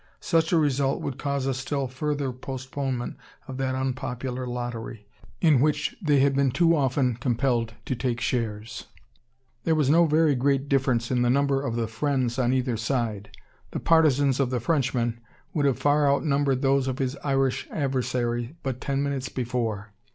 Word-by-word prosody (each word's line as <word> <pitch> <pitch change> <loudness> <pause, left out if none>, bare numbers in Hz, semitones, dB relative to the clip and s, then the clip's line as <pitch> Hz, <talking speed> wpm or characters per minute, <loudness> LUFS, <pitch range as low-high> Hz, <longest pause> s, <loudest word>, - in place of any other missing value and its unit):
Such 165 +2 +1
a 170 - +4
result 140 -3 +1
would 135 -1 -4
cause 140 -2 -1
a 135 - +1
still 135 +1 -2
further 140 +1 -2
postponement 130 0 -4 0.3
of 130 - -6
that 130 -1 -1
unpopular 130 -1 -3
lottery, 120 -3 -5 0.4
in 155 -6 +5
which 150 0 +1
they 145 -6 +3
had 140 0 +3
been 140 -1 +3
too 170 +5 +3
often 130 -4 +1
compelled 120 -2 0
to 130 - -1
take 120 0 -2
shares. 115 -3 -3 0.8
There 160 - +2
was 145 -3 +2
no 170 +1 +5
very 155 0 +3
great 135 +2 +1
difference 130 -4 +1
in 125 -1 +2
the 120 - +3
number 140 +1 +2
of 130 -5 -3
the 115 -1 0
"friends" 125 +1 -1
on 125 -1 +2
either 130 -2 0
side. 115 -4 -2 0.4
The - - -4
partisans 145 -5 +3
of 135 -3 +2
the 125 -1 -1
Frenchman 120 -4 0 0.3
would 145 -2 +2
have 135 - +1
far 145 0 +3
outnumbered 140 -2 +1
those 135 0 +2
of 130 -1 -2
his 135 0 -1
Irish 135 -2 0
adversary, 125 -2 -1
but 130 -2 -3
ten 140 0 -1
minutes 140 -2 -2
before. 115 -5 -3
130 Hz, 170 wpm, -26 LUFS, 125-140 Hz, 0.8 s, in